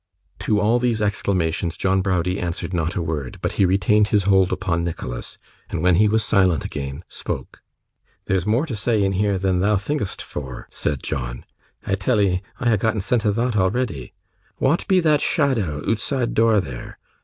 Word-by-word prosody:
To 105 Hz, -, +1 dB
all 110 Hz, +4 st, +3 dB
these 120 Hz, -2 st, +1 dB
exclamations 90 Hz, -5 st, 0 dB
John 95 Hz, 0 st, +1 dB
Browdie 90 Hz, -1 st, 0 dB
answered 90 Hz, +1 st, -3 dB
not 85 Hz, 0 st, -1 dB
a 90 Hz, -, -1 dB
word, 75 Hz, -6 st, -4 dB
but -, -, -2 dB
he 95 Hz, -, +2 dB
retained 100 Hz, +3 st, +3 dB
his 105 Hz, -2 st, +2 dB
hold 95 Hz, 0 st, +3 dB
upon 90 Hz, -2 st, -1 dB
Nicholas; 65 Hz, -8 st, -5 dB, 0.3 s
and 80 Hz, -, -3 dB
when 90 Hz, -2 st, +4 dB
he 105 Hz, +2 st, +5 dB
was 110 Hz, +1 st, +1 dB
silent 95 Hz, -, +2 dB
again, 70 Hz, +2 st, -5 dB
spoke. -, -, -6 dB, 0.6 s
'There's 95 Hz, 0 st, 0 dB
more 120 Hz, +8 st, +2 dB
to 135 Hz, -8 st, -4 dB
say 110 Hz, 0 st, +1 dB
and 95 Hz, 0 st, +1 dB
hear 100 Hz, 0 st, +1 dB
than 95 Hz, -1 st, +1 dB
thou 105 Hz, +3 st, +3 dB
think'st 105 Hz, -1 st, -3 dB
for,' 65 Hz, -4 st, -7 dB
said 70 Hz, -3 st, -2 dB
John. -, -, -4 dB, 0.4 s
'I 95 Hz, -, +1 dB
tell'ee 95 Hz, -2 st, +1 dB, 0.2 s
I 120 Hz, -3 st, +2 dB
ha' -, -, -2 dB
gotten 110 Hz, +1 st, 0 dB
scent 115 Hz, +1 st, +1 dB
o' -, -, +4 dB
thot 120 Hz, +2 st, 0 dB
already. 95 Hz, -, -1 dB, 0.4 s
Wa'at 145 Hz, +6 st, +1 dB
be 185 Hz, -2 st, +4 dB
that 155 Hz, -3 st, +3 dB
shadow 115 Hz, -, +1 dB
ootside 120 Hz, +2 st, -1 dB
door 110 Hz, -1 st, +4 dB
there? 65 Hz, -9 st, -7 dB
95 Hz, 180 wpm, -22 LUFS, 85-110 Hz, 0.6 s, he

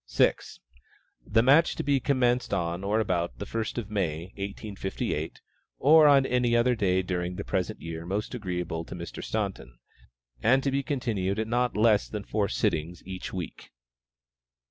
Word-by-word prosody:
6. -, -, +1 dB, 0.7 s
The 115 Hz, +2 st, +3 dB
match 145 Hz, +6 st, +5 dB
to -, -, -3 dB
be 140 Hz, -1 st, +2 dB
commenced 125 Hz, -2 st, +1 dB
on 85 Hz, +1 st, -2 dB
or 105 Hz, +3 st, +1 dB
about 90 Hz, -5 st, -1 dB
the 100 Hz, -, -5 dB
first 115 Hz, +3 st, -3 dB
of 110 Hz, -3 st, -4 dB
May, 90 Hz, -3 st, -2 dB
1858, 100 Hz, -5 st, -4 dB, 0.4 s
(or 155 Hz, +2 st, +7 dB
on 140 Hz, -2 st, +6 dB
any 125 Hz, -2 st, +2 dB
other 120 Hz, +1 st, +3 dB
day 95 Hz, -5 st, +1 dB
during 90 Hz, -1 st, -2 dB
the -, -, -4 dB
present 90 Hz, -2 st, -2 dB
year 80 Hz, 0 st, -5 dB
most 100 Hz, +5 st, -3 dB
agreeable 90 Hz, -7 st, -3 dB
to -, -, -8 dB
Mr. 85 Hz, -2 st, -7 dB
Staunton,) 100 Hz, -, -4 dB, 0.6 s
and 130 Hz, +3 st, +4 dB
to 140 Hz, -, +1 dB
be 140 Hz, +1 st, +1 dB
continued 115 Hz, -9 st, -1 dB
at 110 Hz, 0 st, -1 dB
not 120 Hz, 0 st, 0 dB
less 105 Hz, -1 st, +3 dB
than 105 Hz, -2 st, -5 dB
four 100 Hz, -1 st, -1 dB
sittings 85 Hz, +2 st, -1 dB
each 95 Hz, -1 st, -6 dB
week. 90 Hz, -2 st, -6 dB
100 Hz, 165 wpm, -27 LUFS, 90-120 Hz, 0.7 s, or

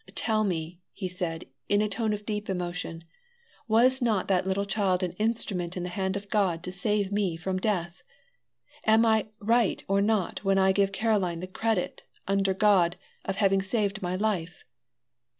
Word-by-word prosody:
Tell 215 Hz, -2 st, +2 dB
me," 170 Hz, -3 st, -3 dB, 0.3 s
said 175 Hz, -2 st, -4 dB, 0.2 s
he, 205 Hz, -, +2 dB
in 205 Hz, -, +4 dB
a -, -, +1 dB
tone 215 Hz, +1 st, -1 dB
of 210 Hz, 0 st, -4 dB
deep 210 Hz, -1 st, -3 dB
emotion; 175 Hz, -2 st, -4 dB, 0.6 s
"was 250 Hz, +4 st, +4 dB
not 220 Hz, -5 st, +1 dB
that 190 Hz, -1 st, +2 dB
little 195 Hz, +1 st, 0 dB
child 195 Hz, -3 st, +1 dB
an 180 Hz, -, -1 dB
instrument 195 Hz, -6 st, -1 dB
in 180 Hz, -, -3 dB
the 180 Hz, -, -3 dB
hand 190 Hz, +1 st, -2 dB
of 200 Hz, 0 st, -8 dB
God 185 Hz, -5 st, +1 dB
to 180 Hz, -, -5 dB
save 200 Hz, +1 st, -1 dB
me 200 Hz, -5 st, 0 dB
from 185 Hz, +2 st, -2 dB
death? 180 Hz, -4 st, -2 dB, 0.8 s
Am 220 Hz, +1 st, +5 dB
I 220 Hz, -1 st, +3 dB
right 230 Hz, 0 st, +2 dB
or 195 Hz, +1 st, +2 dB
not 205 Hz, -3 st, 0 dB
when 195 Hz, -1 st, +2 dB
I 190 Hz, 0 st, +4 dB
give 195 Hz, 0 st, +2 dB
Caroline 195 Hz, -5 st, 0 dB
the 180 Hz, -, -4 dB
credit, 200 Hz, +1 st, -2 dB, 0.3 s
under 195 Hz, -1 st, +1 dB
God, 190 Hz, -4 st, +3 dB, 0.3 s
of 195 Hz, -, -2 dB
having 195 Hz, -1 st, +3 dB
saved 200 Hz, 0 st, -1 dB
my 180 Hz, 0 st, -2 dB
life? 185 Hz, -4 st, -2 dB
195 Hz, 175 wpm, -27 LUFS, 180-210 Hz, 0.8 s, Am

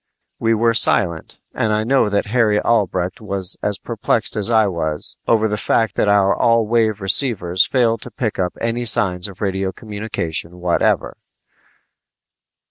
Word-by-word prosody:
We 115 Hz, 0 st, +1 dB
were 115 Hz, +1 st, +2 dB
silent, 85 Hz, -7 st, +1 dB, 0.2 s
and 110 Hz, -, -1 dB
I 105 Hz, 0 st, 0 dB
know 130 Hz, -2 st, +2 dB
that 100 Hz, +1 st, 0 dB
Harry 110 Hz, -1 st, +1 dB
Albrecht 95 Hz, -5 st, -1 dB
was 100 Hz, -3 st, -3 dB
as 105 Hz, -2 st, -2 dB
perplexed -, -, -2 dB
as 105 Hz, +1 st, +1 dB
I 110 Hz, -2 st, +4 dB
was 80 Hz, -5 st, -2 dB
over 110 Hz, -1 st, +2 dB
the 105 Hz, 0 st, -2 dB
fact 115 Hz, -1 st, +1 dB
that -, -, 0 dB
our 100 Hz, -1 st, +3 dB
all 115 Hz, -1 st, +2 dB
wave 110 Hz, -2 st, 0 dB
receivers 95 Hz, -4 st, +2 dB
failed 115 Hz, -4 st, +1 dB
to -, -, -5 dB
pick 110 Hz, -2 st, -4 dB
up 90 Hz, -1 st, -1 dB
any 115 Hz, +1 st, -2 dB
signs 100 Hz, -6 st, +1 dB
of 95 Hz, -2 st, -13 dB
radio 95 Hz, -1 st, -2 dB
communication 100 Hz, -6 st, -5 dB
whatever. 90 Hz, -1 st, 0 dB
105 Hz, 155 wpm, -19 LUFS, 95-115 Hz, 0.2 s, I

